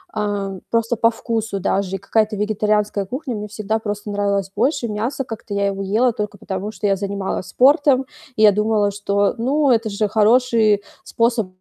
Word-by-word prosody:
А, 205 -2 -2 0.2
просто 230 +1 +1
по 230 +1 +3
вкусу 225 -3 -3
даже 195 0 -1
и - - -2
какая-то 215 +2 0
вегетарианская 210 -1 0
кухня 255 +3 -5
мне 210 0 -5
всегда 215 +1 -2
просто 205 -1 -5
нравилась 200 -1 -1
больше. 240 +2 +1
Мясо- 230 +6 -2
как-то 225 -4 -7
я 200 0 +1
его 195 0 -2
ела 220 +6 +2
только 210 -1 -4
потому, 190 +2 -5
что 215 - -6
я 195 - +3
занималась 195 -1 -3
спортом, 275 0 +4 0.3
и 215 - +2
я 210 - +8
думала, 210 0 +1
что, 200 0 0
ну, 275 +4 +2
это 225 -2 +2
же 210 +1 0
хороший 220 -1 +3 0.2
способ 230 -3 0
210 Hz, 175 wpm, -20 LUFS, 200-230 Hz, 0.3 s, я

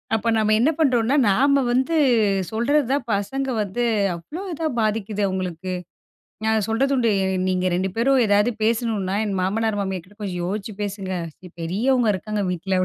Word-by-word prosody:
அப்போ 225 +1 -2
நம்ம 215 0 +2
என்ன 255 +7 +4
பண்ணுறோம்னா. 255 -4 +3
நாம 275 +7 +3
வந்து 260 +7 +1 0.6
சொல்றது 275 +6 +2
தான் 275 -3 0
பசங்க 265 +7 -2 0.2
வந்து 205 +5 -3 0.3
அவ்ளோ 175 - -8
இதா 325 -1 -2
பாதிக்குது 215 -1 -1
அவங்களுக்கு. 185 -1 -3 0.7
நான் 220 -2 +2
சொல்றது 265 +5 +1
உண்டு 240 -3 +2
t 190 0 0
நீங்க 185 0 0
2 190 +2 0
பேரும் 260 +3 +3
ஏதாது 205 +2 +3
பேசணும்னா 220 -4 0
என் 195 -2 -2
மாமனார், 210 +3 0
மாமியார் 190 -3 -3
கிட்ட 205 +2 -21
கொஞ்சம் 180 -4 -3
யோசிச்சு 205 +3 -4
பேசுங்க. 195 -2 -4 0.5
பெரியவங்க 225 +8 +1
இருக்காங்க 210 +1 -3
வீட்ல. 185 +1 -1
215 Hz, 155 wpm, -22 LUFS, 190-245 Hz, 0.7 s, என்ன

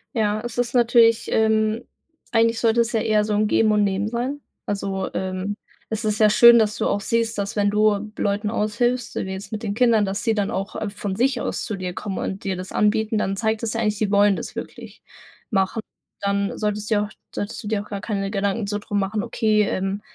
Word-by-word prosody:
Ja, 215 -1 +1
es 240 -1 -6
ist 245 -1 0
natürlich, 235 -2 +4
ähm 220 +1 +2 0.5
eigentlich 230 0 +3
sollte 230 0 +3
es 235 0 -1
ja 225 - +1
eher 215 -1 +2
so 215 - -1
'n 210 +1 +2
Geben 220 0 +3
und 210 -1 +3
Nehmen 200 +1 0
sein. 245 +5 -3 0.3
Also, 195 -1 -2
ähm, 190 +2 -3 0.3
es 220 0 -3
ist 215 0 0
ja 215 -1 +6
schön, 235 +3 +8
dass 215 -1 +1
du - - -1
auch 205 - 0
siehst, 230 +1 0
dass 200 0 -3
wenn 205 -1 +2
du 210 0 +2
Leuten 205 +1 -1
aushilfst, 235 +3 -1
wie 190 - -3
jetzt 190 +3 -7
mit 215 0 -5
den 205 -2 -2
Kindern, 230 -2 +3
dass 200 +2 -3
sie 225 0 +1
dann 205 0 -1
auch, 195 -1 -4
äh, 215 - -3
von 200 -1 -4
sich 250 +2 +1
aus - - -2
zu 215 - -3
dir 185 -2 -4
kommen 195 +1 -5
und 190 - -4
dir 195 -1 -1
das 185 +1 -7
anbieten. 220 +1 +1
Dann 195 -2 0
zeigt 220 +2 -1
das 225 - -1
ja 230 - -1
eigentlich, 210 -2 0
sie 205 -1 -1
wollen 205 0 +4
das - - -6
wirklich - - -8 0.5
machen. 195 +2 0 0.4
Dann 200 0 0
solltest 210 0 -2
du - - +4
dir 205 - +2
auch - - -10 0.2
solltest 205 +4 -4
du - - -6
dir 210 -1 0
auch - - -17
gar 200 -1 -5
keine 195 -2 -2
Gedanken 200 +1 -1
so 205 0 -1
drum 205 0 -2
machen: 205 +2 -1
„Okay, 215 -2 +2
ähm, 195 0 -2
210 Hz, 230 wpm, -23 LUFS, 200-225 Hz, 0.5 s, schön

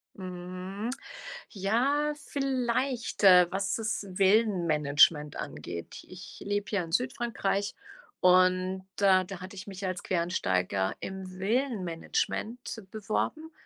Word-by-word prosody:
Mhm, 185 +3 -6 0.6
ja 255 +9 +1
vielleicht, 260 -5 -1
äh, 180 -2 +8
was 195 +1 -1
das 220 -2 -2
Villenmanagement 170 -7 +3
angeht. 85 +3 -7
Ich 185 0 -11
lebe 205 0 -1
ja 195 -4 +1
in 165 - -9
Südfrankreich 225 -3 -1 0.4
und 185 +1 +4
da 190 -2 +5
da 190 0 -8
hatte 185 +2 -8
ich 190 +1 -8
mich 195 -1 -6
als 185 -1 -3
Quereinsteiger 95 - 0
im 190 0 -6
Villenmanagement 220 +1 -2
beworben, 220 +9 -2
190 Hz, 105 wpm, -29 LUFS, 180-225 Hz, 0.6 s, äh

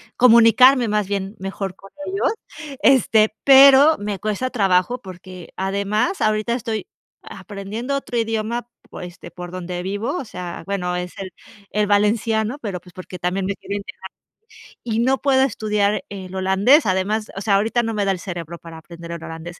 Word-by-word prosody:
comunicarme 245 +1 +6
más 210 -2 0
bien, 200 +1 -3
mejor 195 -1 -5
con 195 0 -16 0.2
ellos, 390 +3 0 0.5
este, 220 -5 +4
pero 275 +3 +8
me 205 -1 -4
cuesta 215 +6 -2
trabajo, 195 +2 +1
porque 185 -2 -11
además, 200 - -1
ahorita 215 +2 +1
estoy 225 -4 -3 0.4
aprendiendo 205 +7 -6
otro 245 -3 -5
idioma, 225 +1 -2 0.2
pues, 180 - -8
este, 175 0 -13
por 175 0 -9
donde 180 -1 -5
vivo, 205 - -3
o - - -4
sea, 180 -5 -7
bueno, 180 -3 -2
es 180 0 -5
el 190 -2 -6 0.4
el 210 -1 0
valenciano, 220 +4 +1
pero, 200 -7 -5
pues, 180 0 -18
porque 185 0 -9
también 180 +2 -1
me 200 - -2
quiero 200 - -6
integrar 200 -1 -8 0.8
y 225 -2 -2
no 260 +2 +2
puedo 265 -1 +3
estudiar 210 -4 0
el 190 -2 -8
holandés, 190 +10 +4
además, 205 +3 -1
o - - -4
sea, 200 -1 +2
ahorita 225 +4 +1
no 225 -1 -2
me 210 - -1
da 195 - +2
el 185 - -3
cerebro, 170 -2 -7
para 165 -1 -11
aprender 170 +1 -11
el 170 -1 -8
holandés. 165 +2 -8
205 Hz, 170 wpm, -21 LUFS, 185-230 Hz, 0.8 s, pero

